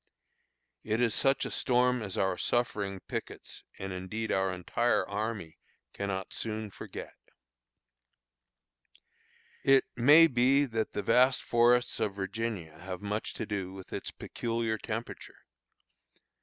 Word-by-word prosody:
It 110 Hz, +1 st, -1 dB
is 120 Hz, -3 st, +2 dB
such 135 Hz, +4 st, +2 dB
a -, -, -4 dB
storm 125 Hz, -1 st, +2 dB
as 100 Hz, -3 st, -4 dB
our 95 Hz, -1 st, +1 dB
suffering 100 Hz, -4 st, -1 dB
pickets, -, -, -7 dB
and 95 Hz, 0 st, -5 dB
indeed 100 Hz, +5 st, -4 dB
our 95 Hz, 0 st, +1 dB
entire 95 Hz, +6 st, 0 dB
army, 105 Hz, -5 st, -4 dB, 0.3 s
cannot 100 Hz, -1 st, -3 dB
soon 110 Hz, -2 st, -3 dB
forget. -, -, -8 dB, 2.5 s
It 135 Hz, -1 st, +5 dB
may 145 Hz, +7 st, +8 dB
be 135 Hz, 0 st, +4 dB
that 115 Hz, -4 st, -2 dB
the 105 Hz, -, -2 dB
vast 125 Hz, +5 st, +4 dB
forests 120 Hz, +1 st, +3 dB
of 105 Hz, -3 st, -1 dB
Virginia 95 Hz, -5 st, -4 dB
have 90 Hz, 0 st, -6 dB
much 105 Hz, +2 st, -3 dB
to -, -, -3 dB
do 95 Hz, -3 st, -4 dB
with 95 Hz, -1 st, -10 dB
its -, -, -4 dB
peculiar 115 Hz, -2 st, -3 dB
temperature. 115 Hz, +1 st, -6 dB
110 Hz, 125 wpm, -30 LUFS, 95-120 Hz, 2.5 s, may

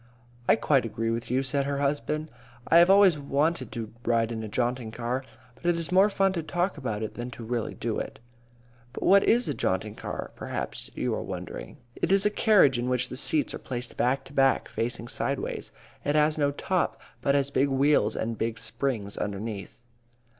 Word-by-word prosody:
"I -, -, +8 dB
quite 135 Hz, -4 st, +2 dB
agree 115 Hz, 0 st, -2 dB
with 115 Hz, 0 st, -3 dB
you," 130 Hz, +2 st, +1 dB
said 140 Hz, +1 st, 0 dB
her 140 Hz, 0 st, -1 dB
husband. 150 Hz, +2 st, -1 dB, 0.4 s
"I 170 Hz, -, +7 dB
have 175 Hz, +2 st, +6 dB
always 195 Hz, -5 st, +6 dB
wanted 140 Hz, -1 st, 0 dB
to 110 Hz, -2 st, -5 dB
ride 115 Hz, -1 st, +1 dB
in 110 Hz, -1 st, -3 dB
a 110 Hz, -, -5 dB
jaunting 120 Hz, +1 st, -1 dB
car, 120 Hz, +3 st, -3 dB, 0.3 s
but -, -, -24 dB
it 175 Hz, -, +4 dB
is 170 Hz, 0 st, -3 dB
more 190 Hz, +3 st, +6 dB
fun 195 Hz, -1 st, +2 dB
to 170 Hz, -, -1 dB
talk 175 Hz, +4 st, -1 dB
about 110 Hz, -4 st, -3 dB
it 110 Hz, -, -4 dB
than 120 Hz, +1 st, -5 dB
to 120 Hz, -1 st, -9 dB
really 115 Hz, -1 st, -2 dB
do -, -, -2 dB
it." -, -, -6 dB, 0.7 s
"But -, -, -5 dB
what 195 Hz, +1 st, +6 dB
is 240 Hz, +2 st, +3 dB
a -, -, 0 dB
jaunting 105 Hz, -2 st, -1 dB
car?" -, -, -6 dB
perhaps -, -, -5 dB
you -, -, -1 dB
are -, -, -2 dB
wondering. -, -, -7 dB, 0.2 s
It -, -, -1 dB
is 195 Hz, +1 st, +4 dB
a 210 Hz, -, +4 dB
carriage 195 Hz, -, +4 dB
in 120 Hz, +1 st, -1 dB
which 125 Hz, 0 st, 0 dB
the -, -, -6 dB
seats 145 Hz, +3 st, 0 dB
are -, -, -5 dB
placed 125 Hz, -1 st, -5 dB
back 130 Hz, +3 st, +1 dB
to 135 Hz, -, -13 dB
back, 135 Hz, -1 st, +3 dB
facing 115 Hz, 0 st, -3 dB
sideways. 135 Hz, +2 st, -3 dB, 0.3 s
It 145 Hz, -, 0 dB
has 150 Hz, 0 st, +4 dB
no 145 Hz, -2 st, +2 dB
top, 180 Hz, +5 st, -1 dB, 0.2 s
but 140 Hz, 0 st, +2 dB
has 140 Hz, 0 st, +1 dB
big 140 Hz, +1 st, +3 dB
wheels 140 Hz, +2 st, +3 dB
and 115 Hz, 0 st, -3 dB
big 115 Hz, 0 st, -1 dB
springs 115 Hz, -3 st, -2 dB
underneath. 105 Hz, +2 st, -5 dB
135 Hz, 205 wpm, -27 LUFS, 115-155 Hz, 0.7 s, I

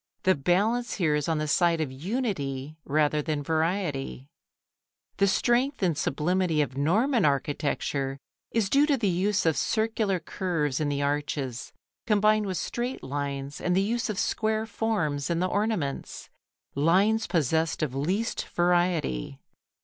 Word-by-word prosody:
The 185 Hz, -, +5 dB
balance 210 Hz, -, +1 dB
here 165 Hz, -6 st, +1 dB
is 150 Hz, +2 st, 0 dB
on 160 Hz, -, +1 dB
the 155 Hz, 0 st, -1 dB
side 170 Hz, +2 st, +3 dB
of 155 Hz, -4 st, -2 dB
unity 150 Hz, -, -3 dB
rather 150 Hz, +1 st, +2 dB
than 150 Hz, -1 st, -2 dB
variety. 155 Hz, -4 st, -1 dB, 0.9 s
The 200 Hz, -, +4 dB
strength 240 Hz, +5 st, +1 dB
and 170 Hz, -4 st, +2 dB
sublimity 170 Hz, +2 st, 0 dB
of 135 Hz, -2 st, -6 dB
Norman 215 Hz, -, +2 dB
architecture 140 Hz, -1 st, -1 dB, 0.3 s
is 225 Hz, -3 st, +1 dB
due 280 Hz, +7 st, +4 dB
to 285 Hz, -3 st, +3 dB
the 220 Hz, -4 st, 0 dB
use 190 Hz, +3 st, +1 dB
of 160 Hz, -2 st, +3 dB
circular 220 Hz, -3 st, 0 dB
curves 160 Hz, -5 st, -2 dB
in 150 Hz, -2 st, 0 dB
the 145 Hz, 0 st, -1 dB
arches, 140 Hz, -4 st, -2 dB, 0.4 s
combined 215 Hz, -1 st, +3 dB
with 185 Hz, -2 st, -2 dB
straight 245 Hz, +2 st, -3 dB
lines 140 Hz, 0 st, -4 dB
and 180 Hz, 0 st, +1 dB
the 190 Hz, -, +4 dB
use 230 Hz, +3 st, -1 dB
of 210 Hz, -, -3 dB
square 220 Hz, +1 st, 0 dB
forms 205 Hz, -10 st, -1 dB
in 170 Hz, -, +1 dB
the 180 Hz, -, +1 dB
ornaments 200 Hz, -9 st, -2 dB, 0.4 s
lines 195 Hz, +10 st, +3 dB
possessed 160 Hz, -1 st, +1 dB
of 140 Hz, -5 st, -2 dB
least 185 Hz, +12 st, -1 dB
variety. 175 Hz, -, 0 dB
170 Hz, 145 wpm, -27 LUFS, 145-210 Hz, 0.9 s, The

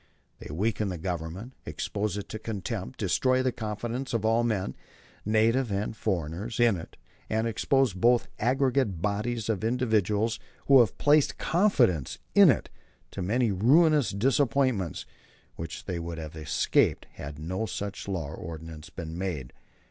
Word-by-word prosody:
They -, -, -9 dB
weaken 105 Hz, +5 st, 0 dB
the 90 Hz, -, -4 dB
government, 90 Hz, +7 st, -5 dB
expose 105 Hz, 0 st, -3 dB
it 100 Hz, -, -5 dB
to 110 Hz, -, -5 dB
contempt, 100 Hz, -, -5 dB
destroy 130 Hz, 0 st, +2 dB
the 130 Hz, -, +2 dB
confidence 115 Hz, +3 st, -4 dB
of 110 Hz, -1 st, -1 dB
all 115 Hz, +1 st, +3 dB
men, 105 Hz, -, -1 dB, 0.5 s
native 115 Hz, +3 st, +2 dB
and 100 Hz, +3 st, -2 dB
foreigners, 95 Hz, +3 st, -3 dB
in 120 Hz, -4 st, +5 dB
it, 80 Hz, -, -9 dB, 0.3 s
and 110 Hz, +1 st, 0 dB
expose 130 Hz, +1 st, +2 dB
both 120 Hz, +6 st, +3 dB
aggregate 130 Hz, -, +1 dB
bodies 105 Hz, +4 st, -1 dB
and 110 Hz, -4 st, -1 dB
individuals 110 Hz, -2 st, +1 dB, 0.3 s
who 135 Hz, -1 st, +7 dB
have 115 Hz, -5 st, +3 dB
placed 150 Hz, 0 st, +3 dB
confidence 125 Hz, -, +2 dB, 0.2 s
in -, -, +8 dB
it -, -, +1 dB, 0.4 s
to 95 Hz, -, -5 dB
many 115 Hz, +5 st, +1 dB
ruinous 145 Hz, -, +4 dB
disappointments 125 Hz, -, +1 dB, 0.5 s
which 80 Hz, -2 st, -7 dB
they 90 Hz, -3 st, -3 dB
would 85 Hz, 0 st, -5 dB
have 80 Hz, -1 st, -7 dB
escaped 75 Hz, -2 st, +1 dB
had 70 Hz, +1 st, -8 dB
no 95 Hz, +8 st, -3 dB
such 100 Hz, -1 st, -5 dB
law 90 Hz, -7 st, -3 dB
or -, -, -7 dB
ordinance 80 Hz, 0 st, -8 dB
been 80 Hz, 0 st, -7 dB
made." 85 Hz, -9 st, -4 dB
105 Hz, 150 wpm, -28 LUFS, 90-120 Hz, 0.5 s, in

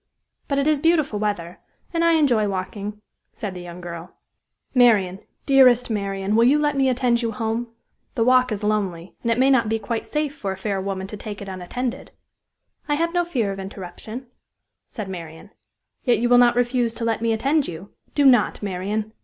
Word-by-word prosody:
"But 280 Hz, -, -1 dB
it 280 Hz, -, +1 dB
is 305 Hz, -1 st, +2 dB
beautiful 310 Hz, -9 st, +2 dB
weather, 185 Hz, -5 st, -3 dB, 0.3 s
and 335 Hz, 0 st, +1 dB
I 335 Hz, 0 st, +4 dB
enjoy 250 Hz, -10 st, +3 dB
walking," 200 Hz, +2 st, -4 dB, 0.3 s
said 205 Hz, -3 st, -5 dB
the 180 Hz, -, -8 dB
young 175 Hz, 0 st, -9 dB
girl. 170 Hz, 0 st, -8 dB, 0.6 s
"Marian 210 Hz, -7 st, +4 dB, 0.3 s
dearest 250 Hz, -3 st, +5 dB
Marian, 200 Hz, -1 st, -1 dB
will 230 Hz, -, +5 dB
you 275 Hz, +4 st, +5 dB
let 295 Hz, -1 st, +1 dB
me 270 Hz, -1 st, +3 dB
attend 245 Hz, -1 st, +1 dB
you 230 Hz, -1 st, -1 dB
home? 225 Hz, +2 st, -2 dB, 0.5 s
The 225 Hz, -, +2 dB
walk 255 Hz, 0 st, +4 dB
is 210 Hz, 0 st, -3 dB
lonely, 195 Hz, -5 st, -1 dB
and 235 Hz, -, -2 dB
it 230 Hz, -, +1 dB
may 265 Hz, +2 st, +4 dB
not 235 Hz, -5 st, +3 dB
be 225 Hz, -, +1 dB
quite 225 Hz, +1 st, -4 dB
safe 300 Hz, -1 st, -2 dB
for 195 Hz, -, -4 dB
a 190 Hz, -, -5 dB
fair 195 Hz, 0 st, -2 dB
woman 190 Hz, -1 st, -3 dB
to 210 Hz, +2 st, -8 dB
take 205 Hz, 0 st, -7 dB
it 200 Hz, -, -8 dB
unattended." 195 Hz, +7 st, -4 dB, 0.8 s
"I 295 Hz, -, +3 dB
have 335 Hz, +3 st, 0 dB
no 350 Hz, 0 st, +2 dB
fear 245 Hz, -12 st, -1 dB
of 195 Hz, -, -6 dB
interruption," 195 Hz, +5 st, -8 dB, 0.6 s
said 215 Hz, -5 st, -6 dB
Marian. 165 Hz, 0 st, -9 dB, 0.5 s
"Yet 245 Hz, -, +3 dB
you 240 Hz, +1 st, 0 dB
will 245 Hz, 0 st, +7 dB
not 240 Hz, -1 st, +5 dB
refuse 240 Hz, -1 st, +1 dB
to 230 Hz, -, -3 dB
let 225 Hz, -1 st, 0 dB
me 230 Hz, 0 st, +1 dB
attend 275 Hz, +7 st, +1 dB
you? 175 Hz, +4 st, -8 dB, 0.2 s
Do 285 Hz, -, +3 dB
not, 245 Hz, -5 st, +4 dB
Marian!" 205 Hz, +3 st, -3 dB
225 Hz, 195 wpm, -23 LUFS, 195-255 Hz, 0.8 s, will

